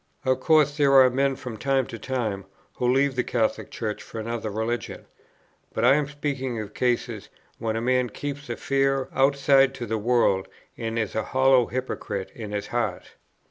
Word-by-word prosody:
Of 130 Hz, 0 st, +2 dB
course 150 Hz, 0 st, +3 dB
there 140 Hz, -2 st, +4 dB
are 130 Hz, -2 st, +7 dB
men 135 Hz, +1 st, +1 dB
from 125 Hz, -4 st, -7 dB
time 135 Hz, +1 st, +1 dB
to 115 Hz, -, -8 dB
time, 110 Hz, -6 st, -3 dB, 0.3 s
who 125 Hz, 0 st, +2 dB
leave 135 Hz, +1 st, +2 dB
the 125 Hz, -, +1 dB
Catholic 110 Hz, -2 st, -1 dB
Church 110 Hz, -2 st, -4 dB
for 115 Hz, -, -8 dB
another 115 Hz, 0 st, -3 dB
religion, 110 Hz, +3 st, -3 dB, 0.7 s
but 115 Hz, -, +1 dB
I 125 Hz, -, +7 dB
am 145 Hz, 0 st, +1 dB
speaking 140 Hz, -4 st, -3 dB
of 105 Hz, -2 st, -7 dB
cases, 120 Hz, -4 st, -1 dB, 0.3 s
when 110 Hz, -1 st, -2 dB
a 115 Hz, -, -1 dB
man 125 Hz, 0 st, +1 dB
keeps 145 Hz, +5 st, -6 dB
a -, -, -3 dB
fair 135 Hz, -1 st, 0 dB
outside 135 Hz, 0 st, +4 dB
to 125 Hz, -, -5 dB
the 110 Hz, 0 st, -2 dB
world 105 Hz, -4 st, +2 dB, 0.3 s
and 115 Hz, 0 st, -4 dB
is 110 Hz, -3 st, -1 dB
a 110 Hz, -, 0 dB
hollow 130 Hz, -2 st, +3 dB
hypocrite 105 Hz, -6 st, -4 dB
in 110 Hz, -3 st, -7 dB
his 105 Hz, -1 st, -3 dB
heart. 115 Hz, -7 st, -2 dB
125 Hz, 180 wpm, -25 LUFS, 110-135 Hz, 0.7 s, are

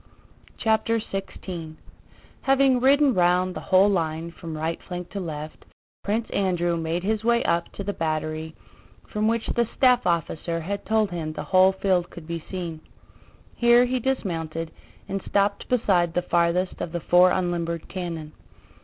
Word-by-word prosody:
CHAPTER 225 Hz, +1 st, +1 dB
XVI 185 Hz, -5 st, -6 dB, 0.7 s
Having 270 Hz, -2 st, +4 dB
ridden 275 Hz, +1 st, +5 dB
round 180 Hz, 0 st, +2 dB
the -, -, -3 dB
whole 190 Hz, +1 st, +6 dB
line 165 Hz, -3 st, -1 dB
from 165 Hz, -2 st, -7 dB
right 160 Hz, +2 st, -2 dB
flank 180 Hz, -1 st, -7 dB
to 200 Hz, -, -4 dB
left, 155 Hz, -3 st, -6 dB, 0.4 s
Prince 220 Hz, +3 st, -1 dB
Andrew 175 Hz, -3 st, +1 dB
made 165 Hz, +1 st, -2 dB
his 215 Hz, +2 st, 0 dB
way 235 Hz, 0 st, +3 dB
up 170 Hz, 0 st, 0 dB
to 200 Hz, -, -5 dB
the 205 Hz, +1 st, -2 dB
battery 155 Hz, -1 st, -3 dB, 0.5 s
from 215 Hz, 0 st, 0 dB
which 230 Hz, 0 st, 0 dB
the 235 Hz, -1 st, +1 dB
staff 250 Hz, -5 st, +4 dB
officer 165 Hz, 0 st, -1 dB
had 200 Hz, +5 st, -5 dB
told 215 Hz, -2 st, +2 dB
him 160 Hz, -3 st, -4 dB
the -, -, -5 dB
whole 190 Hz, 0 st, +5 dB
field 190 Hz, -2 st, +1 dB
could 170 Hz, -, -11 dB
be 170 Hz, 0 st, -5 dB
seen. 170 Hz, -4 st, -5 dB, 0.7 s
Here 240 Hz, +1 st, +5 dB
he 255 Hz, +1 st, -1 dB
dismounted, 165 Hz, -10 st, -2 dB, 0.4 s
and 195 Hz, -1 st, -3 dB
stopped 200 Hz, 0 st, +1 dB
beside 185 Hz, -8 st, +2 dB
the 180 Hz, -, +1 dB
farthest 175 Hz, +2 st, +1 dB
of 165 Hz, -, -4 dB
the 175 Hz, -, -1 dB
four 180 Hz, +2 st, +5 dB
unlimbered 170 Hz, -2 st, -1 dB
cannon. 165 Hz, -4 st, -5 dB
180 Hz, 155 wpm, -25 LUFS, 165-210 Hz, 0.7 s, whole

